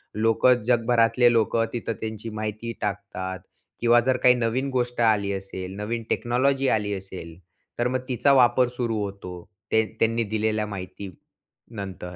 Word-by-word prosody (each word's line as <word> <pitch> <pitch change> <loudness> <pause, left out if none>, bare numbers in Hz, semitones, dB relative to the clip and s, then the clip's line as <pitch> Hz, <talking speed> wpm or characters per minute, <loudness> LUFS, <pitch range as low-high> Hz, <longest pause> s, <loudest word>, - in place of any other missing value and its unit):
लोकं, 115 +3 +3
जगभरातले 120 0 +3
लोकं 115 0 +2
तिथं 115 -1 -3
त्यांची 110 0 -5
माहिती 110 +2 -4
टाकतात 100 -2 -4 0.4
किंवा 120 0 +5
जर 130 -1 +3
काही 125 - +7
नवीन 125 +3 -1
गोष्ट 125 -1 -1
आली 105 -3 +3
असेल, 95 -1 -6
नवीन 115 +3 -3
टेक्नॉलॉजी 135 +3 +1
आली 105 -1 -3
असेल, 95 -4 -8 0.4
तर 120 - +2
मग 130 +1 -1
तिचा 140 +3 +3
वापर 125 -1 +5
सुरू 115 -3 -1
होतो, 100 -2 -7 0.4
ते 110 0 +3
त्यांनी 115 +1 +2
दिलेल्या 110 0 0
माहितीनंतर. 95 0 -9
115 Hz, 140 wpm, -25 LUFS, 100-120 Hz, 0.4 s, काही